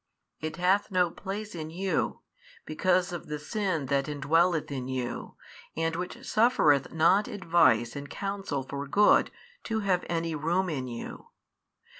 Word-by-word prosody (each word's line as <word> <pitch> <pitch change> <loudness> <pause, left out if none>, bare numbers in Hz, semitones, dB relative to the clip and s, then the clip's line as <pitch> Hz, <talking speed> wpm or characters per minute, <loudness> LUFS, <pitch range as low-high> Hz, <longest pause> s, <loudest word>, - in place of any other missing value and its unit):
It 155 0 -4
hath 185 +4 +2
no 180 -3 +2
place 205 +3 -6
in 155 -2 -5
you, 185 +3 -1 0.4
because 180 +3 +1
of 175 -2 -6
the 150 - -3
sin 180 -1 -2
that 140 +1 0
indwelleth 155 +3 +1
in 130 -2 -4
you, 130 -2 -4 0.4
and 165 0 0
which 180 +1 -6
suffereth 155 - +3
not 170 +6 +3
advice 165 - +2
and 140 0 -6
counsel 195 -8 -3
for 140 +2 -5
good 205 +9 +5 0.4
to 220 -1 -1
have 185 -3 +1
any 165 -1 -1
room 170 +5 0
in 130 -4 -3
you. 120 -1 -7
165 Hz, 145 wpm, -28 LUFS, 145-190 Hz, 0.4 s, good